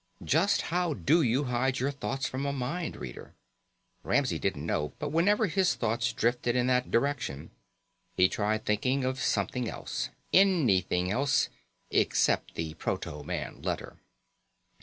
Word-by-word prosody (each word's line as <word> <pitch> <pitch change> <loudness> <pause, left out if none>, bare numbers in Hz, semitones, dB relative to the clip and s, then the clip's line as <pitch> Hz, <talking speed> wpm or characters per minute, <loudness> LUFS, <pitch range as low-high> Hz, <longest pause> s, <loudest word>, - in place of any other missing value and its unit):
Just 170 +7 +2
how 175 -3 +1
do 160 +6 +3
you 130 +1 +2
hide 130 0 0
your 135 +3 0
thoughts 135 -1 -3
from 130 +1 -4
a - - 0
mind 140 +6 -3
reader? - - -9 0.7
Ramsey - - +1
didn't - - -2
know, 75 0 -1
but 145 -1 -4
whenever 205 +7 +3
his 190 0 +2
thoughts 115 +1 0
drifted 120 +1 0
in 125 -1 +2
that 125 0 +1
direction 115 - -1 0.6
he 90 - +5
tried 110 0 -1
thinking 130 +6 +1
of 130 0 -1
something 125 -3 0
else - - -4 0.2
anything 100 - +3
else, 140 +6 +2 0.4
except - - +2
the 80 -1 -3
proto 75 -2 -4
man - - -5
letter. - - -4
130 Hz, 140 wpm, -29 LUFS, 110-150 Hz, 0.7 s, he